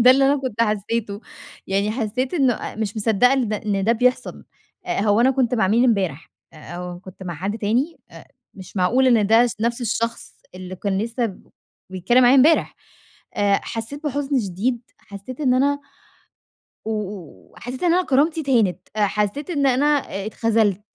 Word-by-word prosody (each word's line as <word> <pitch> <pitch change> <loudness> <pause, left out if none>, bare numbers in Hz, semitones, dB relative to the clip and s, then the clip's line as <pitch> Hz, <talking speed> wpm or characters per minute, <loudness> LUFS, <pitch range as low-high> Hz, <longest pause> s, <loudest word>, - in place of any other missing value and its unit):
ده 250 - +9
الللي 270 +1 +5
أنا 280 +1 +3
كنت 230 -4 -1
حسّيته. 210 -1 -2 0.5
يعني 200 +2 0
حسّيت 245 - -2
إنه 270 -7 +3
أ - - -7
مش 215 -1 -3
مصدّقة 225 +3 +3
إن 260 -4 +1
د 215 - -1
إن 205 -2 -2
ده 225 - +3
بيحصل. 250 +2 0 0.4
آآ - - -1
هو 205 +1 +2
أنا 260 +3 +5
كنت 255 -2 +1
مع 205 -6 +1
مين 235 +4 +3
إمبارح؟! 190 - 0 0.2
آآ 160 - -15 0.2
أو 180 0 -7
كنت 185 0 -13
مع 175 -2 -5
حد 195 +7 -4
تاني؟! 245 +10 0
أ - - -13 0.3
مش 190 +1 -12
معقول 235 +9 +3
إن 230 -5 +4
ده 225 +3 +5
س 240 - -5
نفس 235 +2 -1
الشخص 230 0 -3 0.2
اللي 185 0 -8
كان 195 +1 -2
لسّه 230 -2 -2 0.5
بيتكلّم 215 +8 +2
معايا 245 +1 +6
امبارح. 295 +4 +4 0.6
آآ 200 -1 +2
حسّيت 255 +7 -6
بحُزن 280 -1 0
شديد، 220 +5 -2 0.2
حسّيت 205 +7 -10
إن 260 -4 +2
أنا 285 +2 +1 1.1
و 220 - -2 0.6
و - - -24
حسّيت 250 +4 -7
إن 345 -1 +3
أنا 365 - +2
كرامتي 305 +4 +2
اتهانِت. 230 - +1 0.2
أ 210 -1 +2
حسّيت 210 - -2
إن 285 -5 +1
أنا 260 +2 +2 0.4
اتخذلت. 215 -3 +1
230 Hz, 180 wpm, -21 LUFS, 200-260 Hz, 1.1 s, ده